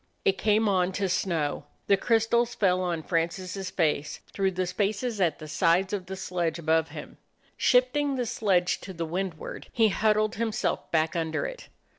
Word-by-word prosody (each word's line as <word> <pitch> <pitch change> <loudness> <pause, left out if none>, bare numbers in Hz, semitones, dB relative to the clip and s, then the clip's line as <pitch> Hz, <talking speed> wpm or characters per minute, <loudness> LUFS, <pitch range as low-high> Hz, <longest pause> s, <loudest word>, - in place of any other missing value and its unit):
It 195 0 +2
came 215 +1 +3
on 185 -2 +2
to 195 +1 0
snow. 165 -6 -1 0.2
The 200 - +5
crystals 230 +3 +2
fell 185 -2 +2
on 170 -3 -2
Francis's 185 +3 -2
face 150 -4 0
through 195 -1 +1
the 185 +1 -1
spaces 205 +4 -1
at 170 -4 +2
the 155 - -9
sides 180 +5 +2
of 190 -3 -3
the 190 - -5
sledge 175 -3 -2
above 160 -1 +1
him. - - -9 0.4
Shifting 265 +3 +2
the 250 -2 -1
sledge 190 -6 +1
to 190 - -8
the 165 -1 -3
windward, 175 0 -5
he 225 -2 +3
huddled 215 +1 +1
himself 230 +1 -1
back 160 +1 +1
under 160 -1 -1
it. - - -7
190 Hz, 170 wpm, -27 LUFS, 170-215 Hz, 0.4 s, The